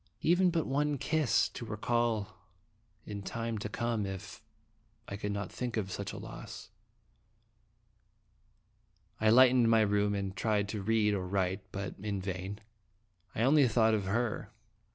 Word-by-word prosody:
even 180 +3 +4
but 165 -2 0
one 145 +2 0
kiss, 155 0 +2
to - - -8
re 110 -2 -5
call 115 -3 0 0.7
in 100 -1 -6
time 115 +2 -3
to 105 - -4
come 115 0 -1
if 95 +1 -7 0.7
I 100 - -5
could 105 0 -3
not 100 -2 -4
think 120 -2 -4
of 95 -3 -2
such - - -4
a - - -8
loss. - - -9 2.5
I 110 - +3
lighted 130 +2 +7
my 115 -1 +5
room, 105 -1 +2
and 100 -1 -3
tried 105 0 0
to 105 -1 -3
read 105 0 +2
or 95 -2 -2
write, 95 0 0
but 100 +1 -4
in 100 -1 -2
vain. 95 +2 -5 0.7
I 110 - +1
only 140 +1 +5
thought 110 -1 +3
of 105 -3 0
her. 110 +3 -1
105 Hz, 155 wpm, -31 LUFS, 100-120 Hz, 2.5 s, lighted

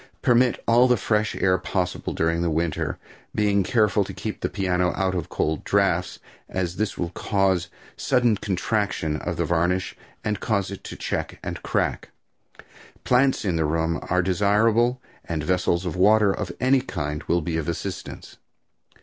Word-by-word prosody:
Permit 125 0 +3
all 120 +2 +6
the 125 -1 +3
fresh 105 0 0
air 95 -1 +2
possible 90 -2 -2
during 85 +1 0
winter, 80 -2 -1 0.4
being 100 -1 +2
careful 105 +1 +2
to 95 -1 -8
keep 105 +3 -5
the - - -1
piano 90 -2 0
out 95 -1 0
of 90 -1 -3
cold 80 -1 -1
drafts, - - +1 0.3
as 90 -1 -2
this 110 -1 -1
will 85 -1 -2
cause 95 -2 +1
a - - -25
sudden 120 -4 +3
contraction 95 -5 -1
of - - -4
the - - 0
varnish 85 +2 0 0.3
and 105 -1 -1
cause 100 -3 -1
it 100 - -8
to - - -7
check - - -3
or - - -3
crack. - - -1 0.9
Plants 130 -1 +2
in 90 -4 0
the 80 - +1
room 80 +2 0
are 90 0 +2
desirable 105 +6 +2 0.3
and 80 -3 -3
vessels 90 +1 +1
of 85 - -3
water 105 +2 +5
of 95 -3 -4
any 130 +1 +3
kind 75 - -4
will 85 0 +1
be 80 +1 -3
of 80 0 -2
assistance. 90 +3 -6
95 Hz, 165 wpm, -24 LUFS, 85-105 Hz, 0.9 s, all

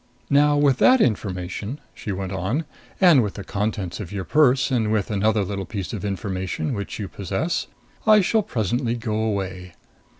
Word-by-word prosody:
"Now 145 +1 +5
with 140 -3 +3
that 255 0 +6
information," 100 - -1
she 105 - -6
went 95 -1 -4
on, 105 - -1 0.3
"and 175 -8 +7
with 105 -4 -3
the 100 - -6
contents 100 -4 -3
of 100 -5 -6
your 100 -2 -3
purse 130 -1 +3
and 110 -4 +1
with 110 -1 0
another 105 +1 +2
little 95 0 -4
piece 95 -8 -5
of 100 - -5
information, 95 -4 -3
which 100 -3 -5
you 105 - -4
possess, 100 - -2 0.4
I 215 -1 +7
shall 220 +4 +2
presently 120 - -1
go 115 -2 -3
away. 95 -5 -3
105 Hz, 170 wpm, -23 LUFS, 95-125 Hz, 0.4 s, and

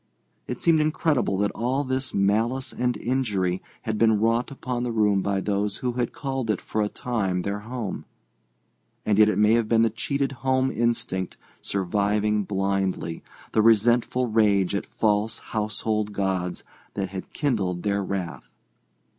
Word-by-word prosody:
It - - -4
seemed 165 -2 +5
incredible 150 - +1
that 100 +1 +1
all 130 +5 -1
this 130 0 -2
malice 110 +7 +1
and 125 0 0
injury 105 -8 0 0.2
had 110 -1 -2
been 110 -2 +4
wrought 115 +3 +2
upon 125 -3 -4
the 120 -1 -1
room 105 -3 +3
by 100 0 0
those 100 0 -1
who 125 - -1
had 120 -1 -1
called 135 -4 -3
it 105 - +1
for 110 - -2
a 105 - 0
time 100 -8 -1
their 100 +1 -2
home; 115 -2 -5 1.0
and 105 -1 +2
yet 110 0 +7
it - - 0
may 105 +1 +5
have 115 -1 +2
been 115 -1 +4
the 115 - +2
cheated 140 +5 -1
home 130 0 +2
instinct 115 -6 -1 0.2
surviving 105 +2 0
blindly, 95 -3 -1 0.3
the 110 - +3
resentful 120 +3 +3
rage 105 -5 +3
at 100 - -2
false 105 0 +1
household 105 -1 -2
gods 95 -3 -1 0.3
that 95 -2 -2
had 95 0 -7
kindled 100 - -1
their 100 -1 0
wrath. 95 -3 -4
105 Hz, 155 wpm, -25 LUFS, 100-120 Hz, 1.0 s, yet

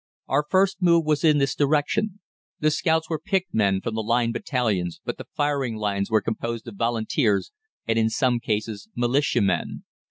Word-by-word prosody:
Our 145 +3 +1
first 195 +1 +2
move 170 -2 +4
was 150 0 +1
in 155 -2 +5
this 140 -2 +1
direction. 155 +8 0 0.4
The 155 0 +2
scouts 160 +1 +1
were 160 -2 -2
picked 190 -2 -1
men 100 -3 +2
from 115 - -3
the 110 - -1
Line 115 +1 +1
battalions, 110 - -1
but - - -4
the - - -8
firing 145 -6 0
lines 100 -2 -1
were 110 -1 +3
composed 115 +2 -4
of 115 - -8
Volunteers 115 - 0 0.4
and, 115 0 +2
in 110 0 +2
some 120 +1 +1
cases, 110 - -3
Militiamen. 120 - 0
120 Hz, 170 wpm, -24 LUFS, 110-150 Hz, 0.4 s, in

